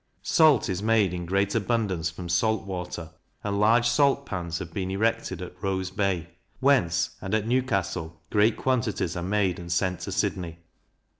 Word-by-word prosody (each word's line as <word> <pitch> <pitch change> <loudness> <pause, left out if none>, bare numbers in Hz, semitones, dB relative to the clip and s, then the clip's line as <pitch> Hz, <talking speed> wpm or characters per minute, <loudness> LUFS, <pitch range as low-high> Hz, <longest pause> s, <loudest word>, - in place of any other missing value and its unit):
Salt 155 -7 +4
is 95 -1 -2
made 110 -4 +3
in 90 -1 -4
great 100 +2 +1
abundance 105 -7 0
from 85 +1 -8
salt 110 +5 +1
water; 90 -4 -5 0.3
and 100 -1 -1
large 115 +3 +4
salt 140 +3 +3
pans 85 -3 -4
have 85 -3 -7
been 95 0 -2
erected 95 -3 -1
at 90 - -8
Rose 95 -1 -2
Bay, 95 -4 -1 0.3
whence, 130 -12 +2
and 95 +3 -1
at 110 -1 0
Newcastle, 95 -10 -1
great 105 +1 +3
quantities 115 -9 0
are 90 - -3
made 95 -1 0
and 85 0 -7
sent 90 +1 0
to - - -5
Sydney. 85 -3 -2
95 Hz, 165 wpm, -26 LUFS, 90-110 Hz, 0.3 s, Salt